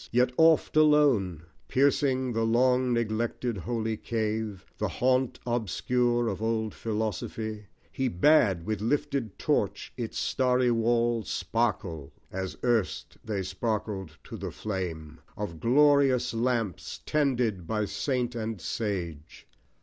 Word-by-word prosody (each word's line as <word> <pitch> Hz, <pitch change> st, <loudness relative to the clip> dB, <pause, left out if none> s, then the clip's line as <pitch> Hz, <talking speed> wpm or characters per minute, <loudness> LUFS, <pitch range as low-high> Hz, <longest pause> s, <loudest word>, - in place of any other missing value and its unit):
Yea, 125 Hz, +1 st, +4 dB
oft 160 Hz, 0 st, +4 dB
alone, 140 Hz, -, +4 dB, 0.2 s
Piercing 130 Hz, -2 st, +2 dB
the 115 Hz, -, 0 dB
long 125 Hz, +2 st, +3 dB
neglected 115 Hz, +1 st, -1 dB
holy 110 Hz, +3 st, -2 dB
cave, 110 Hz, -3 st, -3 dB
The -, -, 0 dB
haunt 130 Hz, 0 st, +1 dB
obscure 120 Hz, +1 st, 0 dB
of 100 Hz, -1 st, -3 dB
old 110 Hz, -1 st, -1 dB
Philosophy, 110 Hz, 0 st, -3 dB, 0.2 s
He 130 Hz, -, -1 dB
bade 100 Hz, -, +3 dB
with 110 Hz, 0 st, -2 dB
lifted 120 Hz, -1 st, -1 dB
torch -, -, -1 dB
its -, -, -4 dB
starry 125 Hz, -1 st, +2 dB
walls 115 Hz, 0 st, +1 dB
Sparkle, 95 Hz, -10 st, -1 dB, 0.2 s
as 95 Hz, 0 st, -4 dB
erst 120 Hz, -5 st, 0 dB
they 100 Hz, -3 st, -2 dB
sparkled 95 Hz, -3 st, -3 dB
to -, -, -8 dB
the -, -, -4 dB
flame 90 Hz, -7 st, -5 dB, 0.2 s
Of 100 Hz, -5 st, -4 dB
odorous 140 Hz, -1 st, +4 dB
lamps 115 Hz, -5 st, -1 dB
tended 125 Hz, -, 0 dB
by 105 Hz, +1 st, 0 dB
saint 120 Hz, +4 st, -1 dB
and 110 Hz, -3 st, -4 dB
sage. 85 Hz, -7 st, -4 dB
115 Hz, 120 wpm, -28 LUFS, 100-125 Hz, 0.2 s, Yea